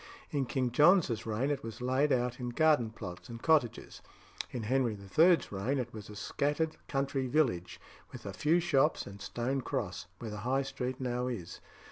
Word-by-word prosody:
In 140 -3 0
King 130 -3 0
John's 145 - +4
reign 115 +6 0
it 140 -1 -1
was 115 -1 -7
laid 130 +4 +1
out 125 -1 +1
in 125 -1 -3
garden 145 -3 +3
plots 100 -5 -8
and 115 0 -7
cottages. 145 -5 +1 0.5
In 120 - -5
Henry 125 0 +1
III.'s 160 - +3
reign 105 +8 -1
it 120 -2 -3
was 105 -1 -8
a 105 - -9
scattered 145 +9 -1
country 135 -1 -1
village, 120 - 0 0.3
with - - -10
a - - -5
few 160 +4 +3
shops 155 -3 +2
and 100 0 -10
a - - -8
stone 130 +3 -2
cross, 90 -7 -3
where 110 0 -6
the 105 - -5
High 130 +5 0
Street 130 -1 -4
now 125 -1 -1
is. 95 -9 -5
125 Hz, 185 wpm, -32 LUFS, 115-140 Hz, 0.5 s, John's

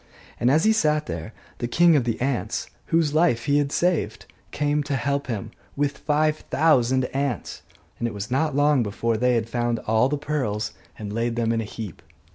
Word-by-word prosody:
And 120 - +3
as 155 +5 +4
he 220 - +5
sat 155 -8 +2
there, 85 +4 -5 0.3
the 120 - -1
king 170 +6 +5
of 135 -5 +2
the 115 - -1
ants 130 -1 -2 0.2
(whose 160 -3 +2
life 155 -8 +2
he 145 0 +3
had 140 -1 -1
saved) 175 0 0 0.2
came 145 0 0
to 145 -1 -1
help 140 +2 -1
him, 110 -6 -4 0.2
with 145 0 -1
five 155 +1 +1
thousand 130 -4 +3
ants; 135 -4 -2 0.4
and 120 - 0
it 115 - -5
was 100 +3 -5
not 140 +2 +1
long 145 -2 +4
before 115 +2 -1
they 125 +2 +2
had 115 -1 0
found 120 0 -1
all 110 +4 +3
the 150 - -1
pearls 130 -8 -2 0.2
and 105 -1 -6
laid 115 +1 -1
them 115 -1 +1
in 115 -1 0
a - - -4
heap. 105 -3 -8
130 Hz, 200 wpm, -24 LUFS, 115-150 Hz, 0.4 s, he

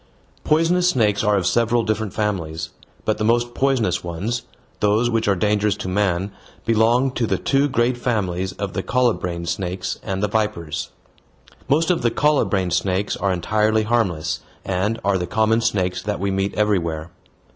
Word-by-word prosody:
Poisonous 170 +3 +3
snakes 105 - +2
are 105 -1 +3
of 95 - -1
several 120 0 +2
different 110 -2 -1
families, 80 -7 -2 0.3
but 110 0 0
the - - 0
most 120 +2 +2
poisonous 135 -4 +1
ones, 95 +8 -3 0.4
those 110 +4 +2
which 115 -2 0
are 100 - +3
dangerous 105 +1 +1
to - - -6
man, 95 0 0 0.3
belong 115 +4 +3
to 120 -3 -1
the - - +1
two 140 +1 +2
great 120 0 +1
families 95 -6 -1
of 100 -2 -4
the 95 - -1
colubrine 95 -9 0
snakes 90 +2 -3
and 95 -1 -3
the - - +3
vipers. 90 -7 -2 0.8
Most 160 +5 +3
of 175 - 0
the 120 - +3
colubrine 115 -11 +1
snakes 95 +3 0
are 95 +1 0
entirely 110 +5 +1
harmless, 95 -9 0 0.3
and 100 +5 -1
are 100 -1 +2
the 90 - -3
common 110 +1 +2
snakes 95 -5 0
that 105 +2 -3
we 100 +1 -1
meet 95 +1 -1
everywhere. 85 -6 0
105 Hz, 165 wpm, -21 LUFS, 95-115 Hz, 0.8 s, Poisonous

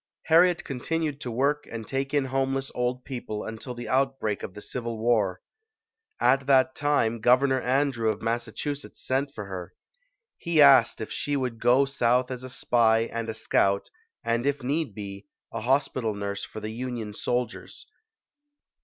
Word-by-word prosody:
Harriet 175 +2 +5
continued 150 +2 -3
to 125 - -4
work 140 +5 0
and 115 -1 -5
take 135 0 -2
in 145 -2 +2
homeless 135 +1 -1
old 125 +1 -2
people 120 -5 -5
until 110 +3 -6
the 120 0 -7
outbreak 135 -6 0
of 90 - -7
the - - -7
Civil 115 -1 -4
War. 110 -5 +1 0.8
At 135 0 +3
that 130 -1 +4
time, 135 -6 +1
Governor 130 +3 +4
Andrew 130 -3 +1
of 110 - -1
Massachu 120 +5 -2
setts 140 - -10
sent 135 +2 0
for 105 - -5
her. 95 -3 -7 0.6
He 170 -2 0
asked 135 -7 +7
if 110 - -5
she 145 - -2
would 125 -4 -3
go 125 +4 +4
South 125 -1 +1
as 125 0 -5
a 130 - -7
spy 115 -2 +2
and 115 -1 -3
a 110 - -3
scout, 100 -2 +1 0.3
and 115 +3 0
if 140 -2 -1
need 140 -4 -1
be, 100 +3 -8 0.3
a 115 - -3
hospital 125 -3 0
nurse 100 0 -4
for - - -7
the 110 +1 -4
Union 120 -2 -5
soldiers. 125 - -3
125 Hz, 165 wpm, -26 LUFS, 115-135 Hz, 0.8 s, asked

